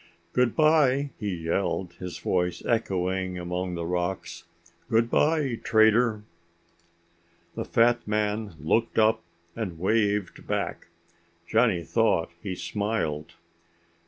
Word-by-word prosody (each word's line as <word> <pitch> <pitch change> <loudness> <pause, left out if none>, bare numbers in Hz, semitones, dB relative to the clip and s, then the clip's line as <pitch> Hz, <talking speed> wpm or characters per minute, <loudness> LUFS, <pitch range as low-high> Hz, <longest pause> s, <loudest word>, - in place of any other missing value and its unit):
"Goodbye," 140 +2 +3
he 105 -3 -2
yelled, 85 +1 -2
his 90 -1 -6
voice 90 -1 -1
echoing 95 -4 -1
among 90 +1 -3
the 85 -1 -3
rocks. 90 +2 -3 0.4
"Goodbye, 125 +3 +2
Trader." 110 0 +3 1.3
The - - -4
fat 120 0 +2
man 105 -2 -1
looked 110 +10 0
up 110 0 +4 0.3
and 100 -8 -4
waved 105 +1 0
back. - - -2 0.6
Johnny 110 -7 +2
thought 100 -3 +1
he 95 -1 -4
smiled. 100 -8 -2
105 Hz, 100 wpm, -26 LUFS, 90-115 Hz, 1.3 s, up